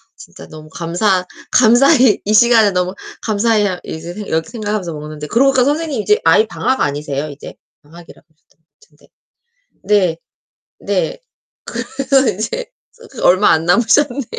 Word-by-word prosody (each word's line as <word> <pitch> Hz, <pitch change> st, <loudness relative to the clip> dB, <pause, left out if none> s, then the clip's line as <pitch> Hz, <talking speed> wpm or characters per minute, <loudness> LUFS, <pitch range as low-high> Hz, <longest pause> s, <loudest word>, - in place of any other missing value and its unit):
진짜 -, -, -14 dB
너무 155 Hz, 0 st, -12 dB
감사 180 Hz, +3 st, -1 dB, 0.3 s
감사히 250 Hz, 0 st, +4 dB
이 210 Hz, -, 0 dB
시간을 220 Hz, -3 st, +4 dB
너무 180 Hz, +1 st, -2 dB, 0.3 s
감사히 215 Hz, -1 st, +1 dB
아 180 Hz, -2 st, -4 dB
이제 165 Hz, +2 st, -8 dB
이렇게 160 Hz, -2 st, -2 dB
생각하면서 210 Hz, -7 st, -4 dB
먹는데 150 Hz, 0 st, -8 dB
그러고 270 Hz, -, +3 dB
보니까 260 Hz, -2 st, +2 dB
선생님 295 Hz, -4 st, -1 dB
이제 420 Hz, -, +2 dB
아이 220 Hz, -, +4 dB
방학 260 Hz, +4 st, -2 dB
아니세요, 145 Hz, 0 st, -2 dB
이제? 145 Hz, 0 st, -11 dB, 0.3 s
방학이라고 165 Hz, +3 st, -16 dB
하셨던 155 Hz, -1 st, -37 dB
것 160 Hz, -, -49 dB, 0.2 s
같은데. 455 Hz, -, -25 dB, 0.8 s
네. 190 Hz, -6 st, +1 dB, 0.6 s
네. -, -, -2 dB, 0.9 s
그러면 265 Hz, -7 st, +3 dB
이제 350 Hz, -, -4 dB, 0.3 s
저 465 Hz, 0 st, -17 dB
그 255 Hz, -, -10 dB
얼마 185 Hz, +3 st, +4 dB
안 160 Hz, 0 st, +2 dB
남으셨네요. 245 Hz, +7 st, +2 dB
210 Hz, 340 characters per minute, -16 LUFS, 165-250 Hz, 0.9 s, 감사히